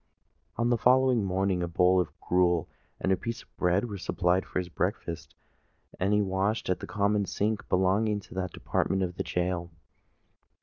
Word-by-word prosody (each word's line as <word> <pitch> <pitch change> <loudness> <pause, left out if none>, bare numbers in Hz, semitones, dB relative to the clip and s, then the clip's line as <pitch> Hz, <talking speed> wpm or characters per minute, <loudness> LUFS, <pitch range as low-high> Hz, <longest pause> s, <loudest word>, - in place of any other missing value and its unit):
On 120 +1 +1
the 120 - +2
following 130 -2 +4
morning 95 -1 0
a 85 - -1
bowl 90 +2 +3
of 85 - -3
gruel 90 -2 +2 0.3
and 95 - 0
a - - +5
piece 115 +5 -5
of - - -33
bread 90 +6 +2
were 100 -3 -6
supplied 90 0 0
for - - -4
his 90 -1 -1
breakfast; 80 -2 -3 0.6
and 95 +2 +1
he 105 0 +3
washed 95 +2 0
at 90 - 0
the - - -7
common 100 0 +1
sink 105 +1 -2
belonging 100 +3 +2
to - - -14
that 95 -1 -3
department 95 0 -1
of 90 -1 -4
the - - -1
gaol. 90 -1 -2
95 Hz, 180 wpm, -28 LUFS, 90-105 Hz, 0.6 s, a